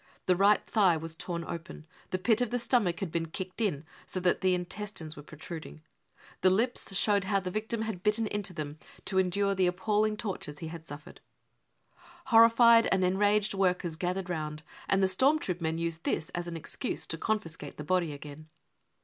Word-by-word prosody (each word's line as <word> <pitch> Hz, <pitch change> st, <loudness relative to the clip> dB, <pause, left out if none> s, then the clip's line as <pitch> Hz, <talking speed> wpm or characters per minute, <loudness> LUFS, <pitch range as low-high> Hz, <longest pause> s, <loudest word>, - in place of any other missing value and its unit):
The 180 Hz, -, +3 dB
right 200 Hz, +3 st, +4 dB
thigh 190 Hz, -7 st, +3 dB
was 160 Hz, +1 st, -6 dB
torn 170 Hz, 0 st, -4 dB
open. 165 Hz, -1 st, -7 dB, 0.2 s
The 185 Hz, -, -1 dB
pit 225 Hz, +5 st, +2 dB
of 245 Hz, -, +1 dB
the 245 Hz, -, 0 dB
stomach 230 Hz, -8 st, +1 dB
had 185 Hz, -5 st, -3 dB
been 165 Hz, 0 st, -1 dB
kicked 185 Hz, +5 st, -6 dB
in, 160 Hz, -9 st, -1 dB, 0.2 s
so 185 Hz, -, -3 dB
that 180 Hz, 0 st, +2 dB
the 185 Hz, -1 st, +3 dB
intestines 180 Hz, -3 st, -5 dB
were 145 Hz, -, -9 dB
protrud 155 Hz, +2 st, -8 dB
ing. 155 Hz, -, -14 dB, 0.6 s
The 185 Hz, -, +6 dB
lips 215 Hz, -1 st, +1 dB
showed 200 Hz, -2 st, +3 dB
how 200 Hz, 0 st, +2 dB
the 185 Hz, -1 st, -5 dB
victim 220 Hz, +2 st, -2 dB
had 220 Hz, -5 st, -4 dB
bitten 210 Hz, +3 st, +2 dB
into 205 Hz, -2 st, -3 dB
them 155 Hz, -3 st, -6 dB, 0.3 s
to 190 Hz, -1 st, +2 dB
endure 195 Hz, +2 st, +2 dB
the 185 Hz, -2 st, +2 dB
appalling 210 Hz, +4 st, +1 dB
tortures 190 Hz, -9 st, -5 dB
he 160 Hz, +1 st, -6 dB
had 165 Hz, 0 st, -9 dB
suffered. 145 Hz, +1 st, -10 dB, 0.5 s
" -, -, -42 dB, 0.4 s
Horrified 230 Hz, 0 st, +7 dB
and 190 Hz, -1 st, +3 dB
enraged 205 Hz, +3 st, +2 dB
workers 180 Hz, -4 st, 0 dB
gathered 180 Hz, +2 st, -2 dB
round, 155 Hz, -3 st, -4 dB, 0.3 s
and 195 Hz, 0 st, +3 dB
the -, -, +5 dB
storm 260 Hz, +11 st, +4 dB
troop 180 Hz, -, -3 dB
men 160 Hz, 0 st, -1 dB
used 165 Hz, -1 st, -2 dB
this 160 Hz, -, -1 dB
as 175 Hz, 0 st, -4 dB
an 170 Hz, -1 st, -4 dB
excuse 200 Hz, -, -3 dB
to -, -, -3 dB
confiscate 165 Hz, -9 st, -3 dB
the 150 Hz, -, -5 dB
body 175 Hz, 0 st, +1 dB
again. 145 Hz, +2 st, -10 dB
185 Hz, 195 wpm, -30 LUFS, 165-210 Hz, 0.6 s, Horrified